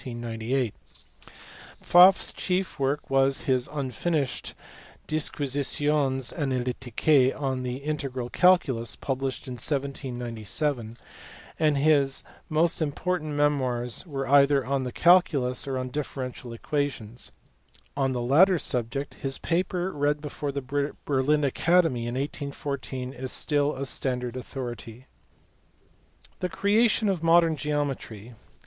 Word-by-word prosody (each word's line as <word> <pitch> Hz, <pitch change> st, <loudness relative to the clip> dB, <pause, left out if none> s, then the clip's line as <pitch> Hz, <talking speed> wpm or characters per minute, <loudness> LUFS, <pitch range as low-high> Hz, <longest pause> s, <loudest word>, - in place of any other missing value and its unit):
Pfaflfs 120 Hz, -, 0 dB
chief 185 Hz, -3 st, -2 dB
work 140 Hz, +2 st, -1 dB
was 135 Hz, 0 st, +3 dB
his 130 Hz, -2 st, +1 dB
(unfinished) 145 Hz, +1 st, -2 dB, 0.5 s
Disquisitiones 145 Hz, -2 st, 0 dB
Analyticae 130 Hz, 0 st, +1 dB
on 135 Hz, -3 st, -1 dB
the 125 Hz, -1 st, -3 dB
integral 135 Hz, -3 st, -4 dB
calculus, 160 Hz, -11 st, +3 dB
published 135 Hz, -1 st, -3 dB
in 130 Hz, -, -5 dB
1797; 125 Hz, -2 st, -3 dB, 0.6 s
and 155 Hz, -3 st, +3 dB
his 140 Hz, -2 st, +2 dB, 0.3 s
most 165 Hz, +2 st, +1 dB
important 155 Hz, +1 st, -2 dB
memoirs 130 Hz, -5 st, 0 dB
were 135 Hz, -3 st, -4 dB
either 140 Hz, 0 st, +4 dB
on 135 Hz, 0 st, -1 dB
the 125 Hz, -, -4 dB
calculus 145 Hz, -7 st, +3 dB
or 135 Hz, -1 st, -2 dB
on 130 Hz, 0 st, -4 dB
differential 130 Hz, -3 st, -5 dB
equations: 120 Hz, -2 st, -3 dB, 0.6 s
on 135 Hz, -1 st, 0 dB
the 125 Hz, -, -2 dB
latter 175 Hz, +9 st, +5 dB
subject 135 Hz, 0 st, -2 dB
his 135 Hz, -1 st, -2 dB
paper 180 Hz, +1 st, -1 dB
read 145 Hz, -1 st, 0 dB
before 145 Hz, -1 st, -4 dB
the 140 Hz, +1 st, -2 dB
Berlin 145 Hz, +2 st, +2 dB
Academy 145 Hz, -3 st, +2 dB
in 120 Hz, -, -3 dB
1814 140 Hz, -2 st, -4 dB
is 130 Hz, 0 st, -5 dB
still 145 Hz, 0 st, 0 dB
a 135 Hz, +1 st, -4 dB
standard 125 Hz, -2 st, -2 dB
authority. 125 Hz, -2 st, -7 dB, 1.3 s
The 180 Hz, -, -2 dB
creation 215 Hz, +3 st, +2 dB
of 190 Hz, -5 st, 0 dB
modern 165 Hz, -1 st, +4 dB
geometry. 135 Hz, -6 st, -3 dB
140 Hz, 110 wpm, -26 LUFS, 125-150 Hz, 1.3 s, latter